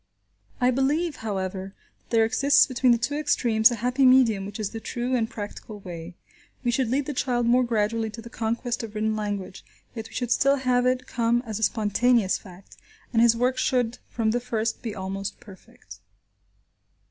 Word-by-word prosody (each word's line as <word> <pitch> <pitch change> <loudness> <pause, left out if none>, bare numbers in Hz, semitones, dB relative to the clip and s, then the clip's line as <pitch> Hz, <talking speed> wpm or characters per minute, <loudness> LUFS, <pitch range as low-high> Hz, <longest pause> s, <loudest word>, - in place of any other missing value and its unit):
I 250 0 +3
believe, 290 +6 0
however, 190 -2 -4 0.2
that - - -38
there 225 -1 +4
exists 280 +5 +4
between 255 -1 +2
the 235 - +4
two 240 +5 -2
extremes 240 -6 +3
a 240 - -2
happy 250 +4 0
medium 245 -7 +5
which 205 +2 -8
is 210 -2 -2
the 225 - -6
true 245 +3 -2
and 225 -2 0
practical 210 -1 -8
way. 175 -2 -8 0.5
We 240 - +1
should 255 +1 +1
lead 270 +3 0
the 295 - -4
child 245 -2 0
more 245 +2 +4
gradually 225 -1 0
to 230 +2 -9
the - - -10
conquest 235 +2 -2
of 220 -2 -8
written 215 0 0
language, 205 -3 -4 0.3
yet 225 -2 -7
we - - -14
should 245 -2 -2
still 275 +3 +4
have 250 -2 +1
it 255 0 0
come 235 0 0
as 220 -2 -4
a - - -8
spontaneous 220 -1 +2
fact, 185 -1 -15 0.4
and 225 - +4
his 230 -1 +5
work 255 +2 +1
should 245 -2 0
from 225 -2 0
the 240 - 0
first 230 -2 -2
be 225 -3 -5
almost 195 +1 -5
perfect. 170 - -15
230 Hz, 190 wpm, -25 LUFS, 210-250 Hz, 0.5 s, medium